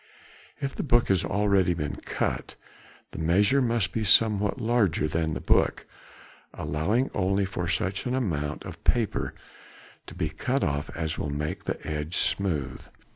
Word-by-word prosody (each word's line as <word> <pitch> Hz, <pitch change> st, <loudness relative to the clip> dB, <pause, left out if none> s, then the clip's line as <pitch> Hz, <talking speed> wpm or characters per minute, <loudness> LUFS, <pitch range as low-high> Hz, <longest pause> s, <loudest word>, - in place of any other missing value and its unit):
If 135 Hz, 0 st, -3 dB
the -, -, -2 dB
book 120 Hz, -4 st, +3 dB
has 95 Hz, -2 st, +3 dB
already 100 Hz, -3 st, +2 dB
been 75 Hz, -3 st, -3 dB
cut -, -, -3 dB, 0.6 s
the -, -, -7 dB
measure 100 Hz, +12 st, +3 dB
must 115 Hz, -5 st, +1 dB
be 110 Hz, -, -1 dB
somewhat 105 Hz, +2 st, +4 dB
larger 110 Hz, -10 st, +2 dB
than 80 Hz, 0 st, -1 dB
the -, -, -3 dB
book, -, -, +2 dB, 0.7 s
allowing 105 Hz, -, 0 dB
only 100 Hz, 0 st, +1 dB
such 90 Hz, +2 st, -2 dB
an 125 Hz, -, 0 dB
amount 75 Hz, -, -2 dB
of -, -, -9 dB
paper 115 Hz, -3 st, 0 dB, 0.7 s
to -, -, -10 dB
be 80 Hz, -, -1 dB
cut 130 Hz, -, -1 dB
off 70 Hz, 0 st, -1 dB
as 80 Hz, -2 st, -3 dB
will 75 Hz, -, -2 dB
make 75 Hz, +2 st, -3 dB
the -, -, -2 dB
edge 75 Hz, +2 st, -3 dB
smooth. 75 Hz, -10 st, -1 dB
95 Hz, 150 wpm, -27 LUFS, 80-110 Hz, 0.7 s, somewhat